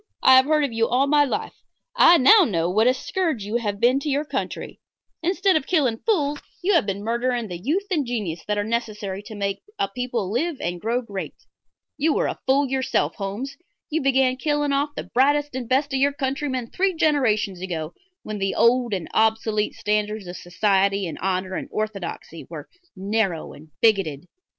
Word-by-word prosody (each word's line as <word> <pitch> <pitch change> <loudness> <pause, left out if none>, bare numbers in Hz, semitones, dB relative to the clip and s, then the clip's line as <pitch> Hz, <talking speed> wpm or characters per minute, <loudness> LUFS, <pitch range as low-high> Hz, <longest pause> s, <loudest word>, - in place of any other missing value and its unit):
I 260 - +8
have 260 0 +6
heard 305 0 +2
of 275 -5 -2
you 230 0 +1
all 255 +3 +2
my 290 +1 +4
life. 270 - -3 0.4
I 350 -8 +7
know 375 +9 +7
now 170 - 0
what 215 +5 +3
a 255 - +5
scourge 320 - -2
you 210 +4 -1
have 205 -4 -3
been 250 +4 +3
to 295 - -4
your 285 +2 0
country. - - -5 0.4
Instead 370 +3 +2
of 310 - 0
killing 265 -10 +1
fools 295 -10 0 0.2
you 400 +3 +2
have 315 - +3
been 200 +1 -3
murdering 235 0 -1
the 175 -1 -6
youth 315 - -1
and 315 -5 +1
genius 210 -10 -4
that 210 0 0
are 205 - 0
necessary 210 -3 -3
to 215 +1 -10
make 200 -1 -2 0.2
a - - 0
people 235 -3 -3
live 310 +7 -1
and 175 0 -4
grow 240 +3 -1
great. 200 -4 -6 0.6
You 300 +1 +2
are - - +1
a - - -3
fool 275 +2 +3
yourself, 265 0 0
Holmes; 210 +8 -5 0.3
you 320 - 0
began 265 -1 +2
killing 295 0 0
off 285 +2 +1
the - - -4
brightest 290 +3 +1
and 250 -2 -5
best 275 +2 +1
of 265 - 0
our 280 +1 +4
countrymen 265 -3 -3
three 380 -1 0
generations 225 - +1
ago, 165 -3 -4 0.3
when 215 -1 -5
the 195 0 -1
old 235 -2 +3
and 180 -4 -5
obsolete 220 -1 +1
standards 210 0 -1
of 175 0 -7
society 195 +2 +1
and 165 - -6
honor 185 0 -1
and - - -4
orthodoxy 200 -6 -5
were 155 -3 -8 0.3
narrow 195 -3 -1
and 155 +2 -14
bigoted. 190 -10 +2
235 Hz, 195 wpm, -23 LUFS, 200-280 Hz, 0.6 s, I